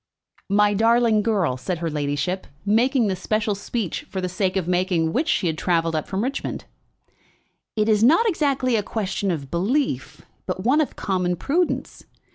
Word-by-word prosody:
"My 205 +1 +4
darling 225 +1 +3
girl," 200 - 0
said 175 +7 -3
her 165 0 -2
ladyship, 145 +5 -2 0.2
making 235 +4 +3
the 195 -2 0
special 215 +3 -1
speech 200 -1 -3
for 190 - -4
the 185 - -1
sake 185 +1 -1
of 180 -3 -1
making 180 -3 +1
which 305 +5 0
she 205 - +1
had 160 -1 -1
travelled 165 -2 +1
up 155 - -2
from 190 +3 -2
Richmond, 270 +2 -3 1.1
"it 215 -1 +1
is 215 -1 +3
not 330 - +5
exactly 275 - +1
a 215 - +2
question 200 -1 -2
of 145 -6 -3
belief, 185 - -1 0.2
but 185 0 -3
one 275 +7 +4
of 300 - -3
common 180 -2 -1
prudence. 325 - -1
200 Hz, 170 wpm, -23 LUFS, 175-230 Hz, 1.1 s, not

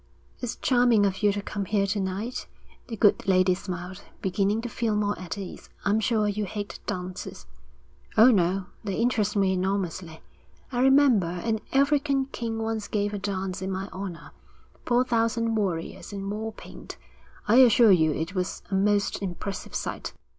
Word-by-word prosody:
'It's 245 -2 -4
charming 245 -5 +3
of 195 0 -1
you 205 -1 +4
to 200 0 -4
come 200 -1 -4
here 200 +1 +1
to 205 +1 -1
night,' 195 +6 -3 0.4
the 225 - -6
good 205 0 +3
lady 185 -1 +4
smiled, 185 0 -6 0.2
beginning 195 +3 0
to 235 - -4
feel 230 -2 -1
more 205 -1 +1
at 185 +1 -6
ease. 195 -2 -8 0.2
'I'm 205 +2 +3
sure 220 -1 +1
you 205 0 -1
hate 205 +1 -6
dances.' 180 0 -5 0.7
'Oh, 230 +4 +8
no, 190 -2 +1 0.2
they 200 -3 -3
interest 220 -3 +1
me 195 -2 +3
enormously. 185 -3 -2 0.5
I 245 -1 0
remember, 265 -8 +5
an 215 +6 -2
African 280 0 +2
king 230 -1 -3
once 225 -1 -2
gave 205 -1 -1
a 205 - -3
dance 190 -1 -3
in 190 - -3
my 190 +1 -4
honour. 185 -3 -7 0.6
Four 245 0 +4
thousand 230 -1 +1
warriors 190 -3 -2
in 195 -1 -5
war 220 +2 -3
paint. - - -11 0.5
I 225 +4 +5
assure 235 -3 +7
you 160 -4 +4
it 160 +4 -3
was 185 -1 -3
a - - -3
most 200 +1 +1
impressive 195 +1 -5
sight.' - - -4
205 Hz, 170 wpm, -26 LUFS, 190-225 Hz, 0.7 s, Oh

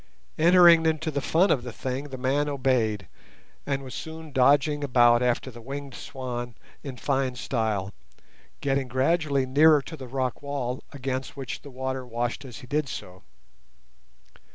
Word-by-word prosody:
Entering 170 -1 +7
into 160 0 0
the 140 -1 -2
fun 175 +8 +3
of 130 - +2
the 125 0 -7
thing, 130 +4 -4
the 135 -2 -7
man 140 +3 0
obeyed, 125 -8 0 0.6
and 135 -2 -3
soon 160 0 -7
was 150 - -13
dodging 145 +3 +3
about 120 -3 +5
after 125 +1 0
the 120 0 -12
winged 140 +2 -7
swan 120 -2 -6 0.3
in 135 -4 -7
fine 130 0 0
style, 110 -5 -2 0.7
getting 135 -1 0
gradually 140 +2 +1
nearer 150 +4 +6
to 160 - -8
the 130 -4 -9
rock 130 -1 -2
wall, 135 -3 -3
against 135 0 -4
which 130 -3 -5
the 140 - -11
water 130 0 -4
washed 120 +3 -3
as 125 -3 -9
he - - -11
did 145 +2 -1
so. 90 -4 -8
130 Hz, 155 wpm, -26 LUFS, 125-145 Hz, 0.7 s, Entering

